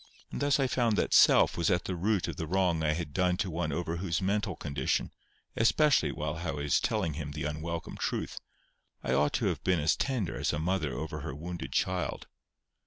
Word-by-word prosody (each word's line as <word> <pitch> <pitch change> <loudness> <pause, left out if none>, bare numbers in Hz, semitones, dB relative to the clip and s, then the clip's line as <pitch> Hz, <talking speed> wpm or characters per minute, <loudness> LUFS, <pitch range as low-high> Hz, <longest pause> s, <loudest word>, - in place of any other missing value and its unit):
And - - -5
thus 145 0 +3
I 135 - +3
found 120 -3 +1
that - - +1
self - - +6
was 85 -1 +1
at 90 -2 +2
the 95 - -2
root 95 +1 0
of 85 - -5
the 80 - -3
wrong 90 -2 +1
I 75 -1 +2
had 80 -2 -4
done 90 0 +2
to 95 -1 -1
one 80 -1 -2
over 85 +2 -2
whose 85 -2 -1
mental 100 0 0
condition, 70 -2 -1 0.4
especially 145 +6 +3
while 75 +1 -3
I 85 0 -4
was 75 -2 +1
telling 105 - 0
him 75 -1 -5
the 75 - -4
unwelcome 80 +3 -4
truth, - - -3 0.6
I - - 0
ought 75 +1 +2
to - - 0
have - - -1
been 90 -2 +2
as 75 +1 +2
tender 125 -10 -1
as - - 0
a - - -1
mother 80 -2 0
over 75 +4 -4
her 70 -1 -5
wounded 85 -3 -6
child. - - -1
85 Hz, 210 wpm, -30 LUFS, 75-95 Hz, 0.6 s, self